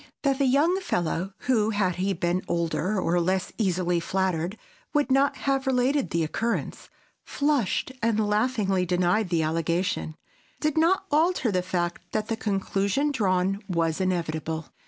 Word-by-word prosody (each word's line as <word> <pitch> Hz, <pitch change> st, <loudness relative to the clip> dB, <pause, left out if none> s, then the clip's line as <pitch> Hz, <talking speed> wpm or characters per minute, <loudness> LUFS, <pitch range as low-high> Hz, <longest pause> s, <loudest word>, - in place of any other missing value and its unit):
That 275 Hz, -1 st, +1 dB
the 275 Hz, -, +3 dB
young 310 Hz, +8 st, +3 dB
fellow 180 Hz, -, -1 dB
(who, 220 Hz, -4 st, +2 dB
had 195 Hz, -5 st, 0 dB
he 190 Hz, +2 st, 0 dB
been 175 Hz, +1 st, 0 dB
older 170 Hz, +4 st, 0 dB
or 175 Hz, -1 st, +1 dB
less 185 Hz, +2 st, -1 dB
easily 180 Hz, -4 st, +1 dB
flattered, 185 Hz, +1 st, -1 dB, 0.4 s
would 290 Hz, -3 st, +2 dB
not 275 Hz, +1 st, +3 dB
have 270 Hz, -1 st, +1 dB
related 265 Hz, +2 st, +2 dB
the 165 Hz, -1 st, 0 dB
occurrence) 230 Hz, +9 st, -3 dB, 0.3 s
flushed 285 Hz, -5 st, 0 dB
and 220 Hz, -2 st, +1 dB
laughingly 210 Hz, -3 st, +1 dB
denied 180 Hz, +3 st, +1 dB
the 165 Hz, -2 st, +1 dB
allegation—did 165 Hz, -, -3 dB
not 335 Hz, +4 st, +3 dB
alter 310 Hz, -, +2 dB
the 185 Hz, -2 st, +1 dB
fact 175 Hz, -1 st, -3 dB
that 215 Hz, 0 st, -1 dB
the 225 Hz, -, 0 dB
conclusion 200 Hz, +6 st, 0 dB
drawn 195 Hz, -5 st, +1 dB
was 165 Hz, -1 st, 0 dB
inevitable. 165 Hz, -3 st, -2 dB
195 Hz, 140 wpm, -26 LUFS, 175-255 Hz, 0.4 s, the